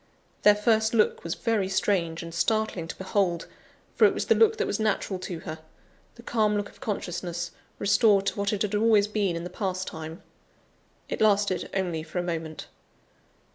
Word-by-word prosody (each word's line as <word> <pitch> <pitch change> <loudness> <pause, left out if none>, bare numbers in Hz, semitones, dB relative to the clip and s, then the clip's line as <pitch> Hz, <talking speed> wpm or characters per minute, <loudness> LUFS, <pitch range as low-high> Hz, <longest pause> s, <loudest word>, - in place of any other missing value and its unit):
Their 210 0 +7
first 220 +1 +2
look 215 - +2
was 170 - -3
very 220 -5 0
strange 175 -4 0
and 165 0 -8
startling 215 -2 0
to - - -6
behold; 190 -3 -1 0.5
for - - +6
it - - +4
was - - -2
the - - +5
look 445 -1 +4
that - - 0
was - - -2
natural 205 -3 0
to 175 -2 -6
her; 160 0 -6 0.6
the 235 - -14
calm 215 -3 +1
look 205 0 -3
of - - -20
consciousness, 175 -6 -3 0.3
restored 200 0 +4
to 200 - -2
what 200 0 +1
it 210 -1 0
had 210 0 -2
always 210 -1 +4
been 205 -4 0
in 170 - -4
the 175 - -5
past 185 -1 -2
time. 160 +2 -7 0.8
It - - -4
lasted 205 -3 +2
only 180 -4 -1
for 160 +3 -8
a 175 - +1
moment. 165 -2 -4
195 Hz, 185 wpm, -27 LUFS, 175-210 Hz, 0.8 s, Their